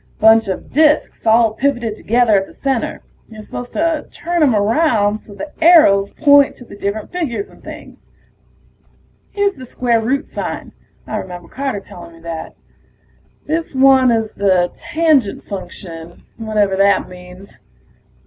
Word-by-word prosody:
Bunch 220 0 +5
of 190 - -5
disks 300 -5 +2
all 225 0 +4
pivoted 240 -3 -1
together 235 +1 +1
at 195 -1 +2
the - - -17
center; 270 -4 -2 0.3
you're 215 -1 -11
supposed 245 +3 -8
to 320 -1 -1
turn 345 0 -3
'em 270 -7 +4
around 215 -1 +1
so 205 - -15
the 300 +7 -7
arrows 200 - +6
point 285 -2 +4
to 245 - -13
the - - -12
different 200 +1 -4
figures 250 - -3
and - - -20
things. - - -12 1.2
Here's 405 -1 0
the 260 - -12
square 240 -2 0
root 260 +5 -1
sign, - - -6 0.3
I - - -4
remember 175 -2 -8
Carter 270 -7 -4
telling 170 -3 -12
me - - -17
that. 165 -1 -7 0.9
This 320 -1 -3
one 265 -1 +5
is 225 -2 0
the 185 -3 +1
Tangent 305 -9 0
Function, 170 -3 -9
whatever 215 -3 0
that 200 +1 +3
means. 180 +2 -14
225 Hz, 150 wpm, -17 LUFS, 200-280 Hz, 1.2 s, arrows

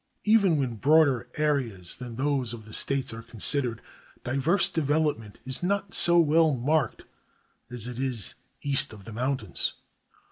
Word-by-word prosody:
Even 205 -6 +3
when 125 -5 -2
broader 140 -2 +3
areas 130 - -1
than 125 -2 -8
those 130 -2 -1
of 110 -2 -10
the 110 - -12
States 135 0 +1
are 115 - -8
considered, 120 +2 0 0.4
diverse 140 +10 +1
development 145 -8 -1
is 130 0 -3
not 195 +2 -2
so 175 0 +7
well 160 -2 +4
marked 135 +1 -1 0.7
as 120 -2 -6
it 125 0 -7
is 125 -7 -2 0.3
east 140 -5 +2
of 105 -2 -13
the 115 - -9
mountains. 125 -4 -2
135 Hz, 145 wpm, -26 LUFS, 115-155 Hz, 0.7 s, so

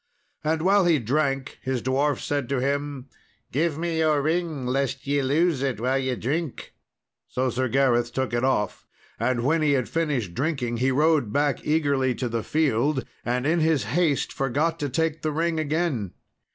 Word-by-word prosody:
And 160 +1 0
while 195 +1 +4
he 170 -3 +4
drank, 135 +2 -1
his 130 -3 -2
dwarf 140 +3 +1
said 145 -4 -2
to 140 -2 0
him, 140 0 -2 0.4
"Give 155 +2 0
me 165 0 -1
your 155 -3 +2
ring, 160 -3 -1
lest 135 +1 -1
ye 140 0 +1
lose 145 +2 +2
it 135 -6 -1
while 130 +3 +1
ye 130 -1 -1
drink." 145 +5 -3 0.5
So 130 0 -1
Sir 130 +2 0
Gareth 120 -2 +2
took 130 -2 -2
it 120 +1 0
off. 105 -7 0 0.3
And 120 +1 0
when 160 +5 +2
he 150 -2 +3
had 130 -4 +1
finished 140 - -1
drinking, 130 - -1
he 130 +3 +2
rode 150 -3 +2
back 145 0 0
eagerly 140 -5 +1
to 125 - -2
the 115 -1 -2
field, 140 0 +1 0.2
and 125 +2 -1
in 165 +3 +2
his 160 -3 +2
haste 160 -4 +1
forgot 145 +5 0
to 145 - -2
take 160 +4 -1
the 155 - -1
ring 165 +1 0
again. 150 - -1
140 Hz, 180 wpm, -25 LUFS, 130-155 Hz, 0.5 s, while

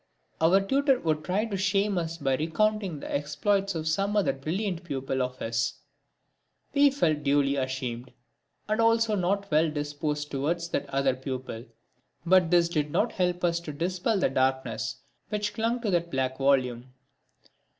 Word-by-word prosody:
Our 170 +4 +5
tutor 270 +5 +2
would 155 -2 0
try 195 +6 0
to 215 -3 -4
shame 195 +1 +1
us 165 0 -4
by 135 -4 0
recounting 185 +3 0
the - - -6
exploits 195 +7 0
of 160 -1 -3
some 200 +6 +1
other 200 -9 +2
brilliant 175 +6 -3
pupil 135 -4 -2
of 125 0 -3
his. 115 -1 -1 1.0
We 285 0 +6
felt 165 - +1
duly 140 -1 +2
ashamed, 130 -2 -3 0.6
and 215 +2 +1
also 230 -1 +3
not 200 0 0
well 155 +2 +4
disposed 150 0 -3
towards 165 +5 -1
that 145 - -2
other 135 -1 +1
pupil, 130 -3 -6 0.6
but 180 -1 +5
this 175 -1 +4
did 150 -3 -1
not 215 +10 +1
help 180 -1 0
to 170 -2 -1
dispel 180 +8 -1
the 185 - +1
darkness 130 -3 -1 0.3
which 210 -1 -2
clung 230 +3 0
to 215 -4 -1
that 170 -1 +1
black 130 -1 -2
volume. 130 -2 +1
165 Hz, 155 wpm, -27 LUFS, 135-195 Hz, 1.0 s, We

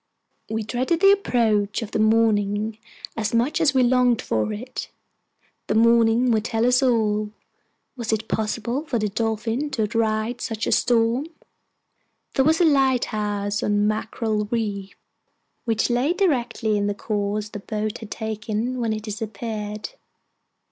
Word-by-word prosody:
We 220 0 -2
dreaded 255 +9 -1
the 390 +1 +7
approach 225 - +1
of 220 - -9
morning 215 -1 +2 0.4
as 225 +1 -1
much 250 +8 +1
as 290 -4 +3
we 260 - +5
longed 245 -1 +3
for 110 -1 -1
it. 245 +5 -6 0.8
The 210 - 0
morning 230 +1 +4
would 220 -2 +2
tell 225 -1 0
us 250 +1 +4
all. 215 -4 +1 0.7
Was 235 -4 -3
it 220 0 -1
possible 230 +5 -2
for 250 - 0
the 215 -1 -1
Dolphin 225 +6 -1
to 235 -6 -1
outride 220 +2 -1
such 225 -2 -3
a - - -1
storm? 240 +4 +2 1.1
There 265 - +3
was 320 +3 +3
a 350 - +5
light 270 -5 +3
house 205 -1 -1
on 205 0 +1
Mackerel 215 0 -1
Reef, 205 -4 -3 0.7
which 225 +1 +1
lay 255 +7 +2
directly 240 - 0
in 205 - 0
the 205 - -1
course 210 0 -2
the 210 - -7
boat 215 +1 -4
had 220 - -9
taken, 220 +3 -3
when 225 -2 0
it 215 -1 -5
disappeared. 215 - -5
225 Hz, 150 wpm, -23 LUFS, 210-245 Hz, 1.1 s, the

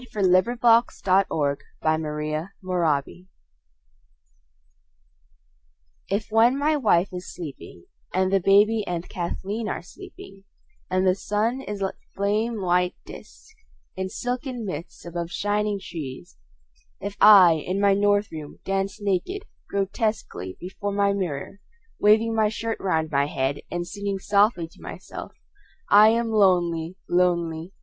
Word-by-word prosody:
William 190 +4 +3
Carlos 235 0 +5 0.4
Williams 140 -2 0 0.2
Danse 155 +3 -2
Russe 165 -6 0 2.9
IF 210 +3 -2
when 230 +4 +4
my 300 +2 +2
wife 200 - +2
is 180 0 -6
sleeping 140 - -9 0.3
and 185 +1 +1
the 195 - +5
baby 205 +4 +4
and 175 -1 -3
Kathleen 200 +5 -4
are - - -4
sleeping 195 +2 -13 0.4
and 185 +1 +1
the 185 - +4
sun 215 +6 -1
is 205 -6 -5
a 190 - -1 0.2
flame 210 +3 0
white 180 0 +1
disc 440 - -13 0.4
in 190 0 -3
silken 245 +1 -4
mists 170 -3 -7
above 170 0 -4
shining 205 +3 -1
trees, 150 - -8 0.6
if 200 +1 -5
I 185 -7 +8
in 185 +2 -2
my 200 -1 +4
north 205 +1 +2
room 155 -2 -8
dance 195 +2 -2
naked, 205 - -2 0.3
grotesquely 195 - -2
before 200 +3 -5
my 200 0 +2
mirror 185 -1 -4 0.4
waving 220 +2 +4
my 220 -1 +2
shirt 225 +1 -4
round 160 -4 -1
my 140 0 +2
head 135 0 -1
and 175 0 -3
singing 200 +2 -4
softly 200 -3 +2
to - - -20
myself: - - -8 0.6
"I 210 +1 +8
am 230 0 +1
lonely, 175 -5 +2
lonely. 170 -1 0
195 Hz, 125 wpm, -24 LUFS, 170-210 Hz, 2.9 s, I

